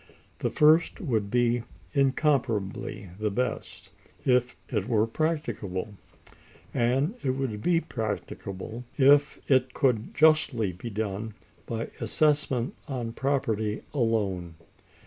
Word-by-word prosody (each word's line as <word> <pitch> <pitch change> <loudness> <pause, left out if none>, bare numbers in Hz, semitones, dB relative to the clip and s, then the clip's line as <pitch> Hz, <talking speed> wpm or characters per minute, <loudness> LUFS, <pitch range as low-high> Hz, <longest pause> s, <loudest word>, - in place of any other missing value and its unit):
The - - 0
first 155 +3 +4
would 110 - -1
be 120 +1 +2 0.3
incomparably 125 - 0
the 105 0 0
best, 125 +5 -3 0.3
if 125 -1 +3
it 105 -4 -1
were 110 -2 +3
practicable; 115 - -2 0.8
and 130 - +2
it 130 -1 +1
would 120 -6 -2
be 170 +3 +3
practicable 110 - -5
if 145 +1 +5
it 130 -2 +3
could 125 -6 +1
justly 150 -10 +4
be 90 +7 -7
done 105 0 -3 0.3
by 115 0 -3
assessment 135 0 +1
on 120 -4 -3
property 115 -6 -1
alone. 100 - 0
120 Hz, 110 wpm, -27 LUFS, 105-140 Hz, 0.8 s, if